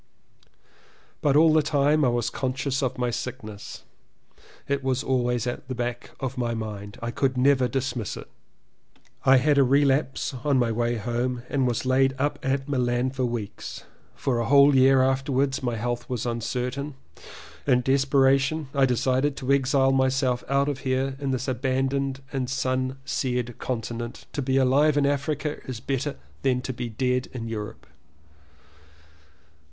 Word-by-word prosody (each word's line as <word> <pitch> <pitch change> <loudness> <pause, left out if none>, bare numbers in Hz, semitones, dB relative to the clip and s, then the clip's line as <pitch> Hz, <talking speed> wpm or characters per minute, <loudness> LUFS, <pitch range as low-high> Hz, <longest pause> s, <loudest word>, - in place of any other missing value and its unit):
But 145 -2 +2
all 155 +1 +6
the 155 - +5
time 150 +1 +2
I - - +4
was 120 -2 0
conscious 135 +1 -2
of 130 -3 -1
my 125 -1 0
sickness. 110 -5 -6 0.8
It 140 -1 -1
was 130 +1 0
always 125 -2 0
at 120 +1 -4
the 130 - -4
back 120 0 -4
of 130 -1 -4
my 120 -1 -1
mind. 105 -2 -6
I 120 - -2
could 130 +1 0
never 130 0 +4
dismiss 125 -4 -3
it. - - -9 1.0
I 130 0 +7
had 140 +2 +3
a - - +7
relapse 135 +1 +2
on 145 -2 +2
my 120 -2 +2
way 120 +1 0
home 120 +2 -2
and 135 -3 +1
was 120 +1 -1
laid 135 +1 +3
up 145 +1 -1
at 135 0 -1
Milan 125 -2 0
for 130 -1 -1
weeks. 115 -4 -5 0.3
For 125 -3 -1
a 115 - 0
whole 140 +1 +6
year 130 0 +6
after 135 +2 0
wards 135 0 +1
my 120 -3 -1
health 120 +2 -3
was 125 -3 -2
uncertain. 125 +4 -3 0.7
In 125 -2 +3
despera 135 0 +4
tion 145 +1 -2
I 135 -1 +4
decided 130 +3 +1
to 130 +1 +1
exile 135 0 +3
myself 130 -1 +1
out 140 0 +1
here 130 0 -1
in 140 -1 -2
this 130 0 -2
abandoned 135 +1 -1
and 130 -2 -2
sun 130 0 -1
seared 125 -4 -2
continent. 120 -1 -4
To 145 - -2
be 130 0 +1
alive 140 +3 +4
in 145 - +3
Africa 145 +1 -1
is 125 -4 -5
better 135 +3 -2 0.3
than 125 -2 +1
to 130 - -4
be 120 0 -4
dead 125 +2 0
in 115 -3 -5
Europe. 105 -2 -6
130 Hz, 160 wpm, -25 LUFS, 125-135 Hz, 1.0 s, I